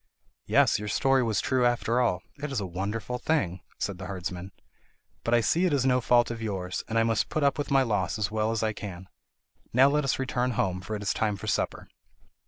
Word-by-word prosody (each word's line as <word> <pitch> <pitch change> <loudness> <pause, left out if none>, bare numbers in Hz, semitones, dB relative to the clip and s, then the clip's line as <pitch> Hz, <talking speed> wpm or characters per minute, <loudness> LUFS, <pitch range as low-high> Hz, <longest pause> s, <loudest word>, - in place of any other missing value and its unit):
"Yes, - - +4
your 105 - -5
story 135 +4 +3
was 115 -4 +1
true 130 -1 +1
after 120 0 +2
all; 105 -8 +1 0.2
it 150 -1 -3
is 135 - -1
a 100 - -3
wonderful 105 +7 -3
thing," 95 - 0 0.2
said 100 -3 -3
the 95 - -6
herdsman. 90 -1 -5 0.7
"But 115 - +2
I 120 - +4
see 160 - +2
it 165 - 0
is 135 -2 +2
no 125 -1 +3
fault 120 0 +3
of 115 -1 -6
yours, 95 -4 -3
and 115 - -1
I 115 - +4
must 115 -1 +1
put 155 - -1
up 140 +1 +2
with 145 - -2
my 135 -1 +4
loss 105 -6 -1
as 105 -2 -1
well 110 0 0
as 115 -1 -1
I 110 0 0
can. 95 -3 -8 0.6
Now 130 +3 +6
let 150 +1 +1
us 135 - +1
return 125 -1 -1
home, 95 -3 -1
for 110 +4 -5
it 105 - -5
is 100 - +1
time 105 -2 0
for 100 - -8
supper. 110 - -1
115 Hz, 230 wpm, -27 LUFS, 100-125 Hz, 0.7 s, Now